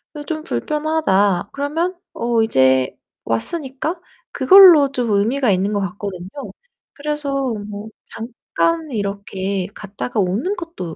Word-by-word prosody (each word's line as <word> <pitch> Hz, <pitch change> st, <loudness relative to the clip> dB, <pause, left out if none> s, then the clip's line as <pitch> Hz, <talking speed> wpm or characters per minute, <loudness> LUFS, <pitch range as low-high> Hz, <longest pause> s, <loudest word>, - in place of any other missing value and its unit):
이 295 Hz, -, -6 dB
좀 310 Hz, -1 st, -4 dB
불편하다.' 300 Hz, -, 0 dB
그러면 320 Hz, +6 st, -1 dB, 0.2 s
어 235 Hz, -1 st, 0 dB
이제 130 Hz, -, +3 dB, 0.3 s
왔으니까 275 Hz, -, -2 dB, 0.3 s
그걸로 355 Hz, -8 st, +7 dB
좀 245 Hz, -4 st, -1 dB
의미가 225 Hz, +5 st, +2 dB
있는 195 Hz, +2 st, +1 dB
것 205 Hz, -, +1 dB
같거든요. 185 Hz, -1 st, -5 dB, 0.6 s
그래서 280 Hz, -4 st, -2 dB, 0.2 s
뭐 205 Hz, +1 st, -7 dB, 0.2 s
잠깐 310 Hz, +8 st, -2 dB
이렇게 200 Hz, -3 st, -3 dB
갔다가 210 Hz, +3 st, -5 dB
오는 220 Hz, -, -1 dB
것도 330 Hz, -, -7 dB
235 Hz, 250 characters per minute, -20 LUFS, 200-300 Hz, 0.6 s, 그걸로